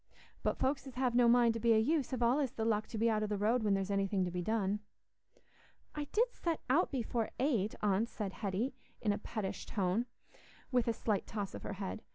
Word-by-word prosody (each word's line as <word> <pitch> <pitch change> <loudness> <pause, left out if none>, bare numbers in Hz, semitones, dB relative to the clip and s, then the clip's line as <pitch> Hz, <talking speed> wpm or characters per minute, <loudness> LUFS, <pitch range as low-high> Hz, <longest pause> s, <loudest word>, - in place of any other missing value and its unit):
But - - 0
folks 270 +1 0
as 260 - -9
have 250 -1 +1
no 240 0 +5
mind 235 -1 +5
to 230 - -3
be 230 0 +4
o' - - +5
use 280 +5 +2
have 255 -3 -1
allays 255 +2 +2
the 220 - -2
luck 215 -1 +1
to 225 - -6
be 225 +2 +2
out 215 -2 +2
o' 215 - 0
the 210 0 -1
road 220 +5 +2
when 205 -2 +2
there's 195 +1 -1
anything 195 -1 +1
to 175 - -3
be 180 0 -2
done." 205 0 0 1.1
"I 295 -1 -3
did 465 - +1
set 335 -2 -2
out 340 +7 +4
before 235 -3 -1
eight, 235 -7 +1
aunt," 210 +3 +2
said 200 -4 -4
Hetty, 210 +5 -2 0.3
in 210 -2 +1
a - - -3
pettish 210 -2 -4
tone, 200 +4 0 0.6
with 250 -2 +2
a 230 - +2
slight 215 -2 -1
toss 205 -3 -4
of - - -6
her - - -4
head. 195 +2 -5
225 Hz, 225 wpm, -34 LUFS, 205-250 Hz, 1.1 s, no